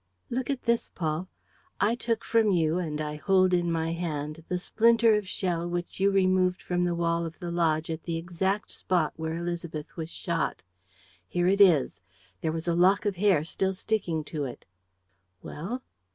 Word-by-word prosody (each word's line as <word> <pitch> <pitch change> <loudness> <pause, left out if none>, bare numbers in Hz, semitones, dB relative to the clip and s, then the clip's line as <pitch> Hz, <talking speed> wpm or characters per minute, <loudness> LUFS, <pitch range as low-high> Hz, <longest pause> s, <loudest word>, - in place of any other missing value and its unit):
Look 250 +2 -2
at 275 -3 -2
this, 235 0 +1
Paul. 160 +1 -2 0.5
I 205 +4 +3
took 230 -1 -1
from 225 -2 +3
you 165 -2 +2
and 155 -4 -3
I 150 0 -3
hold 185 +4 +3
in 175 -1 +2
my 165 0 0
hand 155 -2 -4
the 180 - -1
splinter 230 +4 +4
of 210 -2 0
shell 175 -4 -1
which 175 +1 -4
you 195 +1 +4
removed 185 -2 +2
from 180 0 -1
the 175 -1 0
wall 170 0 0
of 165 0 -6
the 175 -1 -5
lodge 165 -2 +1
at 160 0 -4
the 170 -1 -2
exact 185 +4 -2
spot 175 -5 0
where 160 0 -3
Élisabeth 170 -3 -5
was 160 -1 -5
shot. 170 - -2 0.6
Here 175 - 0
it 195 +2 +3
is. 170 -9 +4 0.4
There 160 - 0
was 160 +1 -4
a 170 - +2
lock 185 +5 +4
of 200 -3 0
hair 185 -6 +3
still 190 +4 -1
sticking 180 -6 -1
to 150 0 -4
it." 125 - -8 0.8
"Well?" 230 +12 -5
175 Hz, 180 wpm, -28 LUFS, 160-195 Hz, 0.8 s, splinter